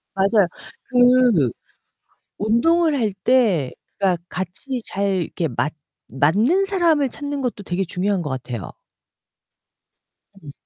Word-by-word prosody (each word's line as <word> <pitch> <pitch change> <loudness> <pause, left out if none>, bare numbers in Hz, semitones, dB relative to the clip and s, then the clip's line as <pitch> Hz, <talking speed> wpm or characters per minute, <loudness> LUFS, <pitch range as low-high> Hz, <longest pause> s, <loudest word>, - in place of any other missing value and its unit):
맞아요. 195 0 +3 0.4
그 245 - +4 0.9
운동을 300 +9 +2
할 215 -4 0
때 210 - +3 0.3
그러니까 185 -4 +1
같이 190 +9 -5
잘 195 -2 0
이렇게 165 -3 -3
맞 145 +5 -2 0.3
맞는 210 - +2
사람을 335 -8 +2
찾는 285 +2 -5
것도 235 -5 -3
되게 185 +2 -1
중요한 185 +2 -1
것 150 - -4
같아요. 120 - -5 1.7
음. 145 - -9
205 Hz, 220 characters per minute, -21 LUFS, 175-260 Hz, 1.7 s, 그